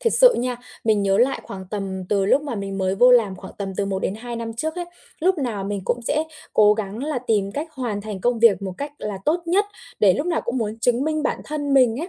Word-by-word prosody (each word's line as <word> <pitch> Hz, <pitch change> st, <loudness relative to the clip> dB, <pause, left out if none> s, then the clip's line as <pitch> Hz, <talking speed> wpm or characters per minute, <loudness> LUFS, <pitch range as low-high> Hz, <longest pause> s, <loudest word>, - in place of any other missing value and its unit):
Thiệt 460 Hz, -, +1 dB
sự -, -, +7 dB
nha, 245 Hz, 0 st, -1 dB, 0.3 s
mình 215 Hz, -2 st, +3 dB
nhớ 195 Hz, 0 st, +2 dB
lại 255 Hz, +4 st, +2 dB
khoảng 190 Hz, -1 st, -8 dB
tầm 195 Hz, -3 st, -4 dB
từ 195 Hz, -2 st, +2 dB
lúc 280 Hz, +7 st, +4 dB
mà 280 Hz, -5 st, -4 dB
mình 195 Hz, -2 st, -4 dB
mới 190 Hz, 0 st, +1 dB
vô 245 Hz, +5 st, +6 dB
làm 220 Hz, -6 st, +4 dB
khoảng 190 Hz, +1 st, -10 dB
tầm 195 Hz, -1 st, -3 dB
từ 200 Hz, -, 0 dB
1 195 Hz, -1 st, -1 dB
đến 190 Hz, -, -2 dB
2 240 Hz, +2 st, -6 dB
năm 230 Hz, 0 st, -4 dB
trước 315 Hz, +7 st, -2 dB
ấy, 355 Hz, -1 st, -3 dB, 0.4 s
lúc 370 Hz, +1 st, +2 dB
nào 225 Hz, -8 st, -2 dB
mình 200 Hz, 0 st, -3 dB
cũng 240 Hz, -, -1 dB
sẽ 300 Hz, +6 st, 0 dB, 0.3 s
cố 210 Hz, -1 st, +6 dB
gắng 210 Hz, 0 st, -4 dB
là 300 Hz, -4 st, -1 dB
tìm 210 Hz, -5 st, 0 dB
cách 300 Hz, +7 st, -3 dB
hoàn 240 Hz, -8 st, -3 dB
thành 205 Hz, -2 st, -6 dB
công 240 Hz, +1 st, +1 dB
việc 215 Hz, -5 st, +5 dB
một 190 Hz, -1 st, -3 dB
cách 285 Hz, +1 st, -4 dB
là 205 Hz, -2 st, -4 dB
tốt 340 Hz, +3 st, +1 dB
nhất, 380 Hz, +5 st, +3 dB, 0.4 s
để 195 Hz, -3 st, +6 dB
lúc 295 Hz, -, -2 dB
nào 340 Hz, -, +1 dB
cũng 240 Hz, -, -2 dB
muốn 220 Hz, -1 st, -3 dB
chứng 245 Hz, +3 st, +2 dB
minh 310 Hz, -1 st, 0 dB
bản -, -, -1 dB
thân 290 Hz, -2 st, -2 dB
mình 250 Hz, -2 st, +4 dB
ấy, 340 Hz, -, -4 dB
230 Hz, 270 wpm, -22 LUFS, 200-285 Hz, 0.4 s, sự